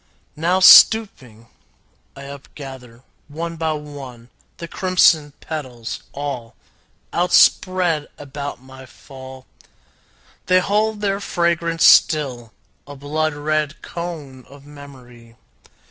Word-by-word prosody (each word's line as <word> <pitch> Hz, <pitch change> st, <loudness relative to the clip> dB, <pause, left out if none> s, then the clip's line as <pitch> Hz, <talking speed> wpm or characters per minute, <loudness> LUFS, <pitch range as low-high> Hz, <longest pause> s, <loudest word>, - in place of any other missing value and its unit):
Now, 175 Hz, +4 st, 0 dB
stooping, 185 Hz, -, +5 dB, 0.7 s
I 140 Hz, -, -11 dB
upgather, 135 Hz, -3 st, -12 dB, 0.2 s
one 165 Hz, +3 st, -6 dB
by 160 Hz, -1 st, -2 dB
one, 135 Hz, -5 st, -10 dB, 0.3 s
The 170 Hz, -, -8 dB
crimson 165 Hz, -5 st, +2 dB
petals, 130 Hz, -7 st, -7 dB
all 135 Hz, -5 st, -6 dB, 0.6 s
Outspread 180 Hz, -2 st, +2 dB
about 145 Hz, -1 st, -7 dB
my 130 Hz, 0 st, -14 dB
fall. 130 Hz, -1 st, -13 dB, 1.0 s
They 185 Hz, -, +4 dB
hold 210 Hz, +3 st, -1 dB
their 200 Hz, -1 st, -1 dB
fragrance 170 Hz, -3 st, 0 dB
still, 130 Hz, -7 st, +3 dB, 0.4 s
a 145 Hz, -, -10 dB
blood 150 Hz, +2 st, -3 dB
red 155 Hz, 0 st, -3 dB
cone 155 Hz, -7 st, -8 dB
Of 140 Hz, +1 st, -16 dB
memory. 125 Hz, -5 st, -15 dB
145 Hz, 100 wpm, -19 LUFS, 130-170 Hz, 1.0 s, stooping